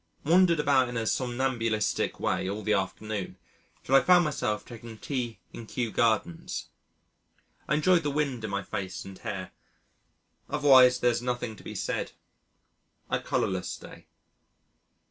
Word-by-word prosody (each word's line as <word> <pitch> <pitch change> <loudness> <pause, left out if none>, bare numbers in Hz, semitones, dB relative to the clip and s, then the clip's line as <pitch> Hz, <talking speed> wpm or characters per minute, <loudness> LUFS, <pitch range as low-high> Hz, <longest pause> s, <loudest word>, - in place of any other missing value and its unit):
Wandered 170 +1 +5
about 135 -4 +3
in 120 - -4
a 115 - -1
somnambulistic 120 -3 0
way 95 - 0
all 105 +2 -4
the 105 - +1
afternoon 100 +1 -3 0.5
till 130 - -3
I 135 - +8
found 180 -2 +5
myself 110 -8 -2
taking 115 -1 -10
tea 120 -2 -3 0.2
in 115 - -9
Kew 120 -2 -2
Gardens. 110 -8 0 1.0
I 150 - +2
enjoyed 175 +3 +4
the 145 - -1
wind 140 -5 -1
in 110 - -3
my 100 0 -2
face 95 -3 -5
and 95 -1 -10
hair. 95 -5 -5 1.0
Otherwise 130 -4 +6
there 120 - +4
is 120 - -2
nothing 120 -2 -3
to - - -15
be - - -8
said - - -3 1.0
a - - +2
colourless 95 -1 -1
day. - - -13
120 Hz, 145 wpm, -28 LUFS, 105-135 Hz, 1.0 s, I